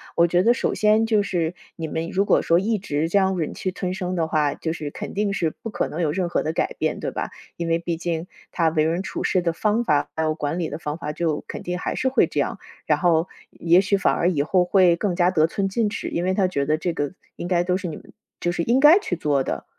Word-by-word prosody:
我 170 0 +5
觉 175 +1 +2
得 235 +3 +5
首 - - -1
先 215 +1 +3
就 215 -3 +3
是， 175 -3 -1 0.2
你 165 -2 -4
们 160 +2 -3
如 195 - +1
果 - - +3
说 170 +1 +3
一 215 +2 0
直 160 -4 -2
这 200 - +2
样 190 -1 +2
忍 160 -3 -2
气 185 - -3
吞 185 0 -3
声 185 -2 -3
的 165 -2 0
话， 150 -2 +1
就 160 - -3
是 150 -3 -5
肯 - - -7
定 205 -1 0
是 170 -4 0
不 225 - -4
可 - - -1
能 170 - -4
有 155 - +1
任 180 +2 -1
何 - - 0
的 155 +1 -2
改 - - -1
变， - - -1
对 - - -3
吧？ - - -4 0.3
因 170 - -3
为 165 0 +1
毕 170 -1 -3
竟 170 0 -3 0.2
他 165 -2 +2
为 155 -1 +1
人 165 +3 0
处 - - -5
事 185 - +2
的 170 -1 0
方 215 +6 +1
法， 150 -8 +1
还 160 - -1
有 155 -1 0
管 155 +3 -2
理 165 - -2
的 150 - -5
方 150 -1 -4
法 150 -2 -4
就 160 -2 -1
肯 - - -7
定 180 0 -3
还 - - -3
是 260 - +1
会 265 - +3
这 - - -3
样。 - - -3 0.3
然 - - +2
后 170 -1 +3 0.2
也 170 +2 +3
许 200 +1 +1
反 195 - +2
而 175 - +2
以 150 -6 +1
后 180 +3 +2
会 180 -2 +4
更 185 -2 -1
加 180 0 +3
得 160 -3 +3
寸 195 +3 -1
进 210 +2 0
尺， 210 - -4
因 170 - -2
为 185 +1 +1
他 190 -2 +2
觉 140 -6 -1
得 155 +1 +2
这 175 +1 -2
个 145 0 -3 0.2
应 175 - -5
该 175 -1 +2
都 180 0 0
是 185 - -5
你 160 - -5
们 - - -14 0.3
就 175 - 0
是 175 - -2
应 240 +6 +2
该 300 +7 +8
去 180 - -3
做 145 -4 +1
的， 70 - -4
175 Hz, 305 characters per minute, -23 LUFS, 160-190 Hz, 0.3 s, 该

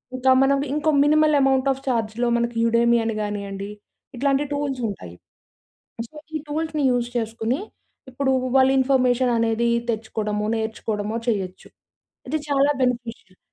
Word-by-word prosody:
ఇంకా 260 +1 +3
మనం 275 +1 +3 0.2
ఇంకో 300 +1 0 0.2
మినిమల్ 305 0 +4
అమౌంట్ 270 0 +2
ఆఫ్ 270 0 -5
చార్జ్‌లో 230 -1 0
మనకి 235 0 -1
యుడెమి 235 +1 +3
అని 225 -1 -2
గానియండి. 200 -1 -5 0.4
ఇట్లాంటి 275 +3 +1
టూల్స్ 280 -3 -2
ఉంటాయి. 90 - -8 0.9
సో - - -31 0.2
ఈ - - 0
టూల్స్‌ని 310 0 -2
యూజ్ 245 -1 0
చేసుకొని. 230 - -2 0.5
ఇప్పుడు 265 +1 -1 0.3
వాళ్ళు 265 0 +5
ఇన్ఫర్మేషన్ 255 -2 +2
అనేది 230 +1 +1 0.2
తెచ్చుకోవడము, 215 -2 -2
నేర్చుకోవడము 220 -1 -3
చేయొచ్చు. 190 -5 -3 0.6
ఇది 310 +4 0
చాలా 280 0 +3
బెనిఫిషియల్. 235 -6 -3
240 Hz, 130 wpm, -23 LUFS, 220-270 Hz, 0.9 s, వాళ్ళు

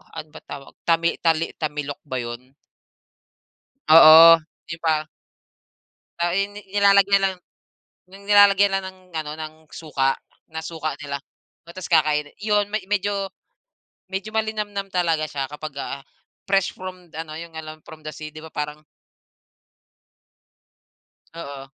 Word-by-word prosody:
ano 155 - -6
ba - - -11
tawag 140 -1 -10
tami 170 0 +2
tali 165 -1 +1
tamilok 150 0 -3
ba 130 -1 -3
'yon? 125 +3 -8 1.3
Oo, 165 +1 +10 0.3
di 160 - -5
ba? 155 -1 +1 1.1
Ah, 170 0 0
eh, 195 +2 +1
nilalagayan 200 -1 +3
lang 190 - -5 0.7
nilalagay 200 0 +5
lang 195 0 0
ng 185 0 -10 0.2
ano 150 -1 -3
ng 155 0 -6 0.2
suka 135 -4 0 0.4
ng 160 0 -5
suka 160 -2 -4
nila 140 -1 -4 0.5
tapos 185 +1 -8
kakain 150 -2 +3
'yon 205 -1 +1
me 215 - +1
medyo 200 -1 0 1.1
malinamnam 210 -2 -2
talaga 165 -4 +1
siya 135 -2 -4
kapag, 150 -1 -7
ah, 140 - -5 0.5
fresh 195 -2 +2
from 185 -2 -9
ano, 155 0 -6
yung 170 -1 -10
alam 155 0 -9
from 155 -1 -13
the 155 - -4
sea 155 0 -8
di 155 - -10
ba 160 - -10
parang 150 0 -4 2.6
Oo. 140 -4 -8
165 Hz, 125 wpm, -23 LUFS, 155-195 Hz, 2.6 s, Oo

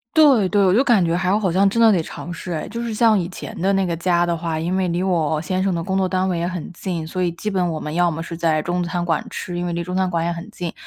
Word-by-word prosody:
对 275 -11 +6
对， 200 +1 +3
我 185 0 +4
就 245 - +5
感 235 -9 +3
觉 165 0 +1
还 185 +3 +1
好 190 -5 0
像 195 +3 +4
真 230 +4 0
的 225 -1 +7
得 180 -4 +2
尝 170 +2 -8
试 175 +1 -7
哎。 160 - -3
就 235 +3 -5
是 235 -1 -3
像 220 0 +4
以 175 -2 -2
前 180 - -8
的 195 +3 +2
那 195 -1 +1
个 170 - -1
家 175 0 +1
的 170 -1 0
话， 165 -1 -3
因 170 +3 -2
为 190 -1 0
离 170 +1 -1
我 160 -5 +1
先 185 +4 -1
生 195 - +1
的 170 -1 -2
工 190 +1 -1
作 190 -1 +1
单 185 0 0
位 180 -2 -1
也 170 +1 -1
很 180 0 -6
近， 170 -2 -4
所 185 +3 -3
以 175 - +1
基 175 +5 -5
本 180 -3 0
我 160 - -3
们 150 0 -5
要 175 0 +3
么 160 0 -4
是 170 0 -7
在 160 -2 +1
中 175 +3 -1
餐 175 0 -2
馆 165 -2 0
吃， 175 - -5
因 175 - -2
为 175 - -2
离 170 0 -2
中 180 +1 -5
餐 185 0 +1
馆 170 -2 0
也 170 - 0
很 170 +5 -8
近， 175 -5 -5
180 Hz, 350 characters per minute, -21 LUFS, 170-190 Hz, -, 的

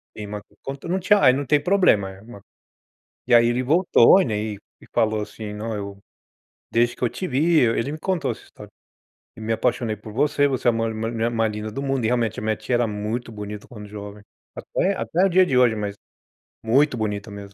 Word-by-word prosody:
É, 105 -1 -7
ma 105 0 -6 0.2
quanto 135 +4 -7
não 185 +2 0
tinha 200 +3 +3
aí, 130 - +8
não 140 +2 -2
tem 145 +2 +3
problema, 180 - +3
é 95 0 -14
uma 110 -2 -13 0.9
e 125 - +5
aí 120 0 +6
ele 120 +2 +1
voltou, 170 +3 +5
né, 110 -4 -2
e 105 -1 -4 0.2
e - - -16
falou 110 -1 +1
assim: 105 0 -7
"Não, 110 +2 -4
eu 100 -1 -6 0.7
desde 120 +1 +2
que - - -22
eu 120 - +2
te 185 - -5
vi" 155 +4 +3
ele 115 +3 +1
me 155 - -5
contou 170 -5 -1
essa - - -9
história, - - -14 0.7
"e - - -11
me 110 +1 -2
apaixonei 110 0 0
por 105 +1 -11
você. 145 +3 +2
Você 130 -3 -3
é - - +8
a - - -1
ma 115 0 -1
mu 110 - -4 0.2
mulher 115 0 -1
mais 115 -2 0
linda 105 +1 -5
do 135 - -4
mundo", 135 -3 -1
e - - +3
realmente 120 -3 0
a - - -8
minha 110 0 0
tia 110 +3 -3
era 120 0 +1
muito 110 +3 -4
bonita 105 0 -7
quando 105 -4 -10
jovem. 105 0 -9 0.3
Até 195 - -1
até 180 +3 0
o - - +3
dia 185 0 +5
de 130 - 0
hoje, 120 -3 +4
mas 105 -1 -3 0.7
muito 130 +5 +3
bonita 105 -1 -3
mesmo. 100 -1 -10
115 Hz, 230 wpm, -23 LUFS, 105-135 Hz, 0.9 s, aí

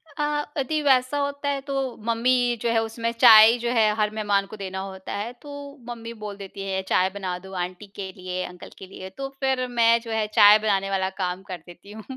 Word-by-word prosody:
अ, 300 - -2 0.3
अदि 300 +3 -1
वैसा 265 -1 +2
होता 285 0 -2
है 280 -1 -1
तो 275 +1 -6 0.3
मम्मी 245 +1 +2
जो 235 - 0
है 230 -1 +2
उसमें 230 +1 -3
चाय 220 -2 +9
जो 235 0 -2
है 220 -3 +3
हर 215 -1 +1
मेहमान 205 -2 +1
को 200 - -10
देना 190 -1 -5
होता 190 -1 -7
है, 210 +4 -4
तो 285 +2 -10
मम्मी 230 -1 -7
बोल 205 -1 -6
देती 195 0 -9
हैं 190 0 -1
चाय 185 +1 +3
बना 185 -3 -4
दो 190 +1 -13
आंटी 185 +3 -8
के 190 -2 -6
लिए, 185 0 -4
अंकल 180 0 -11
के - - -10
लिए। 190 0 -9
तो 275 - -4
फिर 265 -2 0
मैं 235 -1 +3
जो 230 -1 -8
है 220 -1 0
चाय 210 0 +7
बनाने 195 -2 0
वाला 190 -1 0
काम 180 +1 -2
कर 180 - -4
देती 175 +3 -14
हूँ। 220 +1 -10
215 Hz, 220 wpm, -24 LUFS, 195-245 Hz, 0.3 s, चाय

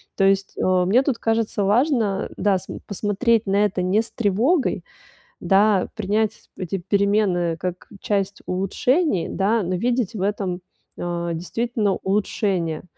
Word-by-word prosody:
То 195 - +1
есть, 195 0 +2
э, - - -1 0.2
мне 230 +8 +4
тут 270 -4 0
кажется 225 -2 0
важно, 220 -2 +1
да, 200 -1 +2
см 185 - -8
посмотреть 210 +3 +1
на 200 +2 +3
это 195 -2 -1
не 185 +4 +2
с 230 - -9
тревогой, 235 - +1 0.6
да, 200 -1 +3
принять 215 0 -1
эти 190 0 -3
перемены 195 -3 +1
как 180 +1 -5
часть 200 -1 -2
улучшений, 195 - 0
да, 210 +3 +1
но 180 +2 -2
видеть 235 +2 0
в 200 - -4
этом, 195 -3 -2 0.4
а, 170 -1 -3
действительно 210 +4 -1
улучшения. 190 -5 -1
200 Hz, 140 wpm, -22 LUFS, 185-220 Hz, 0.6 s, мне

